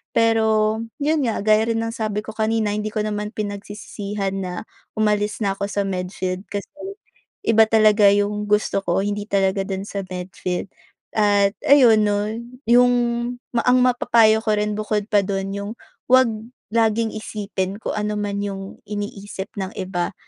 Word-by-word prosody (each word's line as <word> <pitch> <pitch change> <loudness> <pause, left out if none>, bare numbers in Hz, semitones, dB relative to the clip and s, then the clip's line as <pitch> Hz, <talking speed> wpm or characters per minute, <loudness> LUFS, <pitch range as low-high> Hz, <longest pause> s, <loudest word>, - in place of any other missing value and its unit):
Pero, 220 -1 +3 0.2
'yon 310 +1 +2
nga, 225 - -1
gaya 215 +1 +4
rin 225 0 0
ng 225 - -3
sabi 215 -2 -2
ko - - -6
kanina, 220 -1 0
hindi 210 0 -2
ko 215 0 -2
naman 210 0 -3
pinagsisisihan 205 -1 -4
na 180 -1 -4 0.4
umalis 210 -1 +1
na 195 -1 +1
ako 200 - -1
sa 205 0 -1
med 180 -2 -3
field 185 0 -2
kasi 205 -1 -4 0.8
iba 225 - +6
talaga 215 -1 +5
yung 205 +1 0
gusto 210 -1 +2
ko. 175 -1 +1
Hindi 205 0 -3
talaga 195 0 +1
do'n 195 0 -3
sa 200 - -5
med 180 0 -6
field. 180 +1 -4 0.4
At 205 -2 +3
ayun 245 -6 +6
'no, 205 0 +1 0.4
yung 245 +2 +5 0.6
ma 235 - +2
ang 250 0 +5
mapapayo 230 -3 +4
ko 215 - +1
rin 210 0 0
bukod 210 -1 -1
pa 205 - +5
do'n, 195 0 -3
yung 200 +1 -4 0.4
'wag 255 -1 +6 0.4
laging 225 0 +2
isipin 200 -3 -4
kung - - -3
ano 210 0 -1
man 205 -1 -2
yung 195 -1 -6
iniisip 205 -1 -5
ng 190 0 -3
iba. 185 -1 -2
210 Hz, 165 wpm, -22 LUFS, 200-220 Hz, 0.8 s, iba